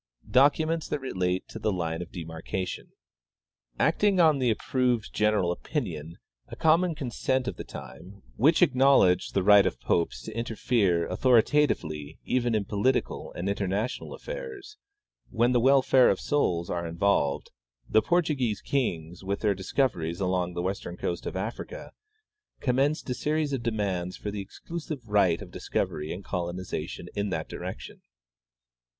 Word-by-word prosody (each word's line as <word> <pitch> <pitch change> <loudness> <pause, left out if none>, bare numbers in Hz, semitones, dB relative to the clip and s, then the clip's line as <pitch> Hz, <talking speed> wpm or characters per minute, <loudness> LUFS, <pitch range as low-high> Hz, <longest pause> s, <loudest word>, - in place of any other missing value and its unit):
" - - -18
Documents 155 +3 +2
that - - -1
Relate 95 -8 -2
to 110 - -7
the 105 - 0
Line 85 -3 -2
of 90 - -8
Demarcation. 80 +2 -5 0.9
"Acting 190 +5 +3
on 155 -4 +5
the 125 -2 +2
approved 120 +1 0
general 105 -4 +2
opinion, 85 - -4 0.3
a - - -8
common 165 +1 +3
consent 130 -1 -1
of - - -2
the - - -6
time, 95 +4 -11
which 155 +8 +4
acknowledged 130 - +4
the 95 - +2
right 105 0 +7
of - - -3
popes 75 -7 0
to - - -8
interfere 110 -6 +1
autlioritatively 115 - +2
even 120 -2 +1
in 105 -2 0
political 110 +6 0
and 90 - -4
international 100 +4 -2
affairs, 455 -5 -8 0.5
when 120 +1 +2
the 125 - +3
welfare 130 0 +5
of 95 - +1
souls 90 -12 0
are 85 -1 -3
involved, 85 -5 0 0.4
the 110 - +4
Portuguese 140 - +1
kings, 90 - -2
with 100 +1 -2
their 105 -2 +3
discoveries 95 - -1
along 90 -2 0
the 85 - -2
western 95 -2 -4
coast 85 -1 -3
of - - -5
Africa, 120 - -6 0.7
commenced 135 +4 +1
a - - +2
series 150 +3 -1
of 135 - -1
demands 100 -6 -2
for 105 - -5
the 100 0 -4
exclusive 150 - -7
right 100 -5 +3
of - - -12
discovery 75 +1 -3
and 95 +3 -6
coloniza 85 -3 -3
tion - - -8
in 100 0 -1
that 80 -4 -3
direction. - - -7
105 Hz, 150 wpm, -27 LUFS, 90-135 Hz, 0.9 s, right